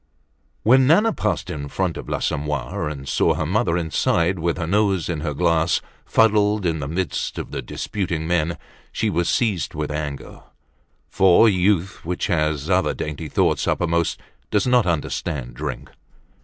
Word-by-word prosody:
When 130 +3 +5
Nana 210 +9 +4
passed 100 -7 -2
in 70 -2 -5
front 90 +2 -2
of - - -7
l'Assommoir 75 -2 -2
and 70 -2 -7
saw 70 - +2
her - - -2
mother 85 - +1
inside, 85 +1 +1
with 85 +1 -1
her 85 - -2
nose 95 -1 +1
in 85 -3 -2
her 75 -1 -3
glass, 85 0 +2 0.3
fuddled 105 -2 +3
in 80 -2 0
the 70 - -4
midst 85 +2 -2
of - - -5
the - - -3
disputing 85 -6 -3
men, 85 0 0 0.3
she - - -1
was 85 +1 0
seized 100 - 0
with 75 -1 -3
anger; 75 -2 -5 0.7
for 95 +3 +5
youth 95 -2 +1
which 90 +2 -2
has 75 -5 0
other 95 0 +2
dainty 75 +1 -5
thoughts - - +1
uppermost 85 -1 0 0.3
does 105 -2 +1
not 125 -4 +3
understand 75 -4 -2
drink. 70 +1 -6
85 Hz, 155 wpm, -22 LUFS, 75-95 Hz, 0.7 s, When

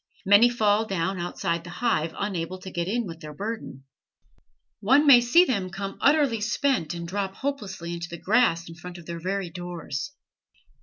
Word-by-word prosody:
Many 205 +5 +7
fall 220 -2 +2
down 190 -1 -2
outside 170 -1 -2
the 175 - -10
hive, 175 -5 -1
unable 185 -3 -3
to 190 - -8
get 170 0 -2
in 235 +4 -1
with 165 -3 -8
their 150 -1 -9
burden. 205 - -6 1.0
One 265 +8 +4
may 265 -4 +8
see 290 +10 +5
them 200 - -1
come 195 +1 -6
utterly 280 -6 +3
spent 215 - 0
and 170 0 -6
drop 195 +1 -3
hopelessly 195 -11 -4
into 170 0 -5
the 170 - -7
grass 185 -5 +2
in 165 - -9
front 175 +1 -10
of 170 - -12
their 170 0 -6
very 190 0 -3
doors. 175 -7 -6
190 Hz, 175 wpm, -25 LUFS, 170-225 Hz, 1.0 s, may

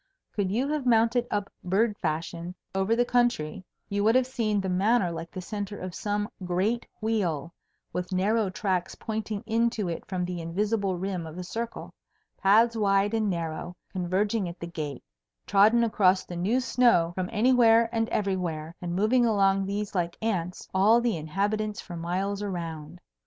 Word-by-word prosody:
Could 200 -3 0
you 240 +8 0
have 300 -4 -1
mounted 235 +1 +3
up 205 -1 -2
bird 205 +4 +2
fashion 170 +2 -3 0.2
over 195 +4 +1
the 245 +1 +2
country, 240 -9 +1 0.2
you 200 0 -1
would 225 +3 +4
have 255 -1 +4
seen 230 -5 0
the 190 - -2
Manor 190 +1 +2
like 165 0 -6
the 185 - -7
centre 205 +1 -5
of 185 -1 -6
some 205 +2 -2 0.2
great 190 +7 0
wheel, 175 -8 -1 0.4
with 180 +1 -3
narrow 205 +3 +2
tracks 185 -1 -1
pointing 215 -1 -4
in 230 +1 +2
to 210 -6 -3
it 165 - -4
from 185 -2 -2
the 175 -1 -4
invisible 195 +3 -1
rim 180 -2 -3
of 160 +2 -9
a 180 - -4
circle, 230 +6 -5 0.4
paths 225 +4 +4
wide 200 -1 +2
and 220 -2 +1
narrow, 170 0 -3 0.2
converging 190 +2 0
at 170 - -10
the - - -5
gate, 155 -5 -5 0.4
trodden 215 +4 +5
across 195 -4 +3
the 175 - -7
new 200 +9 +1
snow 235 -10 +3
from 185 0 -3
anywhere 230 0 +5
and 225 -1 0
everywhere; 175 -6 -2
and 175 -1 -3
moving 220 +6 +3
along 195 -2 +3
these 205 +1 -3
like 175 -3 -1
ants, 185 -6 -2
all 205 +5 +5
the 235 -4 +1
inhabitants 205 +7 -1
for 175 - -8
miles 185 +4 -2
around. 170 -4 -5
195 Hz, 170 wpm, -27 LUFS, 180-225 Hz, 0.4 s, trodden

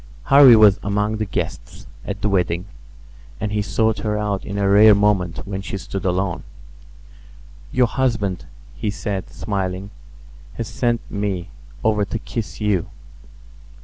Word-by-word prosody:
Harvy 135 -3 +8
was 105 -3 +6
among 105 +2 -1
the 110 - -1
guests 95 - -5 0.2
at 100 - -6
the - - +3
wedding; 90 -3 0 0.7
and 105 - -3
he 105 0 0
sought 110 +2 0
her 105 -1 -1
out 105 -2 -2
in 100 -1 -5
a 100 -1 +1
rare 105 +1 +7
moment 100 -4 +1
when 95 -1 -4
she 100 - -5
stood 95 0 -6
alone. 95 0 -1 1.3
"Your 125 -1 +3
husband," 115 -7 -1 0.3
he 105 - -3
said, 100 -1 -4
smiling, 95 -1 -4 0.6
"has 115 - -4
sent 120 -2 -1
me 100 -3 -3 0.3
over 105 -1 +2
to 100 - -3
kiss 115 0 -6
you." 105 -5 0
105 Hz, 145 wpm, -21 LUFS, 95-110 Hz, 1.3 s, Harvy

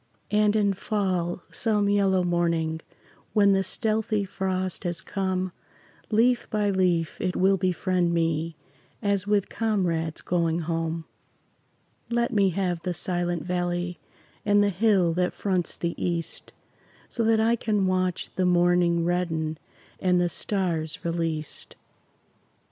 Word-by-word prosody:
And 210 0 +3
in 205 -2 +3
fall, 185 -4 -1
some 210 -3 +1
yellow 195 -2 +3
morning, 170 -2 0 0.5
When 200 -2 +5
the 195 0 +3
stealthy 215 +1 0
frost 185 -1 -2
has 175 -2 0
come, 185 -1 -2 0.6
Leaf 235 +3 +3
by 210 -1 +1
leaf 180 -4 +1
it 185 -1 -1
will 190 +1 +4
befriend 185 -1 0
me 165 -1 0 0.5
As 200 -1 +1
with 205 -2 +2
comrades 175 -8 -1
going 170 -1 0
home. 165 0 -2 1.0
Let 235 0 0
me 200 -3 +4
have 180 -2 -1
the 180 -1 -3
Silent 175 -1 -1
Valley 175 -1 -2 0.4
And 205 0 +4
the 205 - +3
hill 190 -3 +3
that 180 +1 0
fronts 185 -4 -1
the 170 -1 -2
east, 170 -2 -2 0.6
So 235 - -2
that 225 0 +4
I 225 +2 +3
can 210 -4 0
watch 185 -1 0
the 185 - +1
morning 175 -1 +3
Redden 165 -3 -1 0.4
and 180 -1 +2
the 175 0 +2
stars 170 -5 -2
released. 165 -2 -3
180 Hz, 130 wpm, -26 LUFS, 170-200 Hz, 1.0 s, When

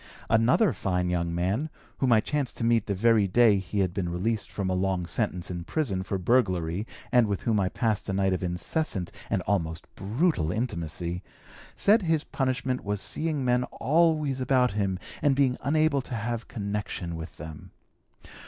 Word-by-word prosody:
Another 120 - +4
fine 90 -2 -1
young 85 -1 0
man, 100 - 0 0.3
whom 130 -2 +2
I 110 -2 +6
chanced 145 +1 -2
to - - -3
meet 115 -2 +2
the 100 - 0
very 110 0 +4
day 105 0 +5
he 95 +2 -2
had 90 -2 0
been 90 -2 -2
released 105 +5 -1
from 100 -2 -3
a 95 - 0
long 95 -1 0
sentence 90 -2 -2
in 85 -1 -4
prison 100 - -1
for 95 +1 -2
burglary 90 -3 +1 0.2
and 125 -3 +5
with 100 -2 -2
whom 110 -3 +2
I 95 -2 +1
passed 110 -1 -1
a - - 0
night 95 -1 +2
of 90 - -2
incessant 90 - -2 0.2
and 95 - 0
almost 80 -5 -1
brutal 105 - 0
intimacy, 85 -5 -3 0.5
said 215 +3 +4
his 160 -4 +1
punishment 130 -1 -1
was 105 0 -2
seeing 150 +5 -1
men 125 0 +3
always 155 -1 +1
about 125 -1 +3
him 100 -2 -1 0.2
and 145 -2 +3
being 135 -2 +3
unable 155 -1 +2
to 125 - -6
have 115 +1 -3
connection 100 -5 -4
with 80 +1 -8
them. 75 0 -9
105 Hz, 175 wpm, -27 LUFS, 90-130 Hz, 0.5 s, I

